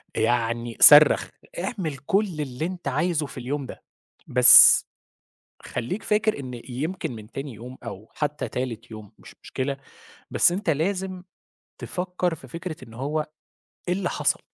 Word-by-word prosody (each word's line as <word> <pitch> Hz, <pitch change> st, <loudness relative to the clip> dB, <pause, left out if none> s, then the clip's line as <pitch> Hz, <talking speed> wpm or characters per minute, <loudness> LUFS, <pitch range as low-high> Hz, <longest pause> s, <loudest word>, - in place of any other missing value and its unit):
يعني 115 Hz, -1 st, -1 dB
صرّخ، 150 Hz, +1 st, +8 dB, 0.3 s
اعمل 180 Hz, -, -4 dB
كل 195 Hz, +10 st, 0 dB
اللي 135 Hz, +1 st, -5 dB
أنت 180 Hz, -4 st, -7 dB
عايزه 155 Hz, +3 st, -1 dB
في 135 Hz, -, -11 dB
اليوم 135 Hz, +3 st, -4 dB
ده -, -, -11 dB, 0.4 s
بس 125 Hz, 0 st, +8 dB, 0.8 s
خلّيك 185 Hz, -, -5 dB
فاكر 215 Hz, -3 st, 0 dB
إن 125 Hz, -3 st, -8 dB
يمكن 155 Hz, +7 st, -4 dB
من 110 Hz, 0 st, -12 dB
تاني 135 Hz, -1 st, -7 dB
يوم 125 Hz, +4 st, -11 dB
أو 110 Hz, -2 st, -9 dB
حتى 150 Hz, 0 st, -3 dB
تالت 120 Hz, -3 st, -6 dB
يوم 110 Hz, -2 st, -11 dB
مش -, -, -15 dB
مشكلة، 135 Hz, +1 st, -4 dB, 0.5 s
بس -, -, +4 dB
أنت 185 Hz, +1 st, -3 dB
لازم 185 Hz, +4 st, -2 dB, 0.5 s
تفكّر 180 Hz, -1 st, -3 dB
في 135 Hz, -, -15 dB
فكرة 165 Hz, +4 st, -7 dB
إن 115 Hz, -, -14 dB
هو 150 Hz, +5 st, -3 dB, 0.6 s
إيه 180 Hz, -, +1 dB
اللي 185 Hz, -1 st, -3 dB
حصل؟ -, -, -1 dB
145 Hz, 145 wpm, -24 LUFS, 125-180 Hz, 0.8 s, صرّخ